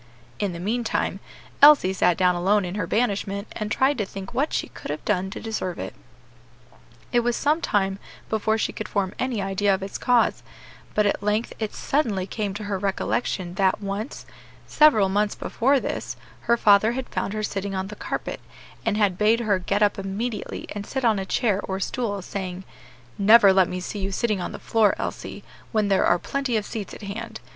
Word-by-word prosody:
In 200 Hz, -2 st, 0 dB
the 170 Hz, -, -7 dB
meantime, 225 Hz, +6 st, -1 dB, 0.4 s
Elsie 285 Hz, -10 st, +8 dB
sat 180 Hz, -2 st, +2 dB
down 180 Hz, -1 st, +4 dB
alone 190 Hz, +3 st, +2 dB
in 175 Hz, -, -4 dB
her 205 Hz, -, -2 dB
banishment, 200 Hz, -3 st, -1 dB
and 215 Hz, -1 st, -5 dB
tried 265 Hz, +3 st, +2 dB
to -, -, +2 dB
think 195 Hz, +1 st, -8 dB
what 275 Hz, +5 st, 0 dB
she -, -, -2 dB
could -, -, -10 dB
have 150 Hz, +1 st, -4 dB
done 190 Hz, -2 st, 0 dB
to -, -, -7 dB
deserve 215 Hz, -5 st, -3 dB
it. 95 Hz, -, -5 dB, 1.2 s
It 240 Hz, -, +4 dB
was 240 Hz, 0 st, 0 dB
some 305 Hz, +3 st, +1 dB
time 195 Hz, -, 0 dB, 0.3 s
before 220 Hz, 0 st, +1 dB
she -, -, -1 dB
could 220 Hz, -, -6 dB
form 200 Hz, -1 st, -1 dB
any 245 Hz, -6 st, -1 dB
idea 195 Hz, +1 st, +2 dB
of 190 Hz, -, -6 dB
its 195 Hz, -, -5 dB
cause; 245 Hz, -2 st, +2 dB, 0.5 s
but 210 Hz, -, +3 dB
at 200 Hz, -, +1 dB
length 210 Hz, +3 st, 0 dB
it 220 Hz, -2 st, -3 dB
suddenly 220 Hz, -10 st, 0 dB
came 200 Hz, 0 st, -3 dB
to 210 Hz, -, -5 dB
her 200 Hz, -2 st, -2 dB
recollection 175 Hz, -, -1 dB
that 190 Hz, -1 st, +3 dB
once, 205 Hz, +4 st, -5 dB, 0.4 s
several 280 Hz, -10 st, +5 dB
months 205 Hz, +2 st, 0 dB
before 270 Hz, +4 st, +1 dB
this, -, -, -4 dB, 0.3 s
her 235 Hz, -, +5 dB
father 215 Hz, +1 st, +5 dB
had 260 Hz, 0 st, -4 dB
found 200 Hz, -, -2 dB
her 215 Hz, 0 st, -3 dB
sitting 195 Hz, -1 st, -3 dB
on 190 Hz, +1 st, -3 dB
the 210 Hz, -, -7 dB
carpet, -, -, -4 dB, 0.4 s
and 220 Hz, -2 st, 0 dB
had 200 Hz, -4 st, +1 dB
bade 220 Hz, +3 st, +4 dB
her 205 Hz, -4 st, +1 dB
get 200 Hz, +3 st, +1 dB
up 205 Hz, -1 st, +2 dB
immediately 210 Hz, +4 st, -4 dB
and 205 Hz, -1 st, -6 dB
sit 265 Hz, -2 st, -2 dB
on 220 Hz, -3 st, +3 dB
a 190 Hz, -, -4 dB
chair 205 Hz, -2 st, +1 dB
or 190 Hz, 0 st, -3 dB
stool, 205 Hz, -1 st, -2 dB
saying, 185 Hz, -1 st, -5 dB, 0.6 s
"Never 205 Hz, -1 st, +7 dB
let 190 Hz, -2 st, +4 dB
me 180 Hz, -, -3 dB
see 195 Hz, +3 st, -5 dB
you 195 Hz, 0 st, -2 dB
sitting 210 Hz, 0 st, 0 dB
on -, -, -4 dB
the -, -, -6 dB
floor, 220 Hz, -3 st, +2 dB
Elsie, -, -, -5 dB, 0.3 s
when 215 Hz, -3 st, +1 dB
there 195 Hz, -, +3 dB
are 175 Hz, -, +4 dB
plenty 275 Hz, +4 st, -1 dB
of 210 Hz, -, -2 dB
seats 210 Hz, -2 st, -5 dB
at -, -, -12 dB
hand. 220 Hz, +3 st, -6 dB
205 Hz, 200 wpm, -24 LUFS, 190-225 Hz, 1.2 s, Elsie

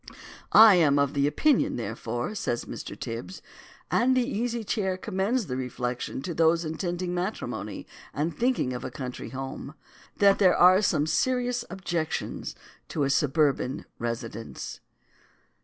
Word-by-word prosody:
I 220 Hz, -4 st, +9 dB
am 145 Hz, -4 st, +4 dB
of 140 Hz, 0 st, +1 dB
opinion, 150 Hz, -, +2 dB
therefore, 120 Hz, -, -4 dB
says 210 Hz, -, -2 dB
Mr. -, -, -7 dB
Tibs, 115 Hz, +11 st, -6 dB, 0.5 s
and 255 Hz, +2 st, +3 dB
the 250 Hz, -, +3 dB
Easy 235 Hz, -2 st, -2 dB
Chair 195 Hz, -3 st, -1 dB
commends 205 Hz, +5 st, -1 dB
the 125 Hz, -, -4 dB
reflection 125 Hz, 0 st, -4 dB
to 175 Hz, -, -3 dB
those 165 Hz, +1 st, +3 dB
intending 175 Hz, +2 st, -3 dB
matrimony 125 Hz, -, -4 dB, 0.3 s
and 155 Hz, +4 st, -2 dB
thinking 240 Hz, -, 0 dB
of 125 Hz, -, -5 dB
a -, -, -4 dB
country 125 Hz, -3 st, -6 dB
home, 135 Hz, +3 st, -6 dB, 0.4 s
that 200 Hz, -1 st, +5 dB
there 185 Hz, -3 st, +5 dB
are 185 Hz, +2 st, +7 dB
some 155 Hz, -7 st, +2 dB
serious 245 Hz, +7 st, 0 dB
objections 170 Hz, -3 st, -3 dB, 0.3 s
to 150 Hz, -, -1 dB
a 140 Hz, -, +1 dB
suburban 140 Hz, -2 st, +1 dB
residence. 115 Hz, -1 st, -5 dB
160 Hz, 135 wpm, -27 LUFS, 130-200 Hz, 0.5 s, I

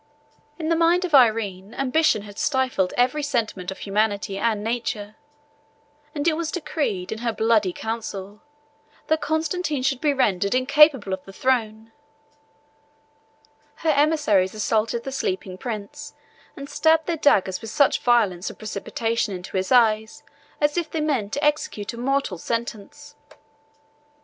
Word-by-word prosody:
In 315 Hz, -1 st, -3 dB
the 330 Hz, -, +3 dB
mind 340 Hz, +2 st, +3 dB
of 345 Hz, -, -6 dB
Irene, 220 Hz, -5 st, +3 dB
ambition 275 Hz, -4 st, +2 dB
had 205 Hz, -1 st, -10 dB
stifled 260 Hz, -9 st, 0 dB
every 255 Hz, +5 st, +2 dB
sentiment 230 Hz, -10 st, -2 dB
of 190 Hz, -, -6 dB
humanity 205 Hz, -1 st, -1 dB
and 210 Hz, +1 st, 0 dB
nature; 220 Hz, -2 st, -3 dB, 1.0 s
and 290 Hz, +2 st, -1 dB
it 320 Hz, -, +3 dB
was 330 Hz, -1 st, -3 dB
decreed 285 Hz, -, -3 dB
in 220 Hz, -, -4 dB
her 235 Hz, 0 st, -1 dB
bloody 220 Hz, -3 st, +2 dB
council, 210 Hz, -1 st, -6 dB, 0.6 s
that 315 Hz, 0 st, +1 dB
Constantine 315 Hz, -2 st, -1 dB
should 270 Hz, -1 st, 0 dB
be 300 Hz, -, +3 dB
rendered 200 Hz, -6 st, +1 dB
incapable 265 Hz, -5 st, +4 dB
of 190 Hz, -, -5 dB
the 195 Hz, -, -11 dB
throne: 225 Hz, -1 st, -1 dB, 1.9 s
her 315 Hz, -, +5 dB
emissaries 285 Hz, -11 st, +2 dB
assaulted 220 Hz, +2 st, 0 dB
the 270 Hz, -, -5 dB
sleeping 190 Hz, -7 st, -3 dB
prince, 230 Hz, +8 st, -7 dB, 0.4 s
and 280 Hz, -1 st, -7 dB
stabbed 320 Hz, +1 st, +2 dB
their 340 Hz, -, -1 dB
daggers 195 Hz, -11 st, +2 dB
with 225 Hz, -, -7 dB
such 280 Hz, +5 st, +3 dB
violence 210 Hz, -8 st, +2 dB
and -, -, -11 dB
precipitation 215 Hz, 0 st, -2 dB
into 180 Hz, +1 st, -9 dB
his 190 Hz, +3 st, -1 dB
eyes 220 Hz, -3 st, +3 dB, 0.4 s
as 295 Hz, +2 st, +1 dB
if 335 Hz, -3 st, -1 dB
they 320 Hz, -, -3 dB
meant 265 Hz, -9 st, -1 dB
to 285 Hz, -, -2 dB
execute 290 Hz, -8 st, -1 dB
a -, -, -9 dB
mortal 270 Hz, -7 st, -1 dB
sentence. 235 Hz, -, -5 dB
235 Hz, 145 wpm, -23 LUFS, 205-295 Hz, 1.9 s, her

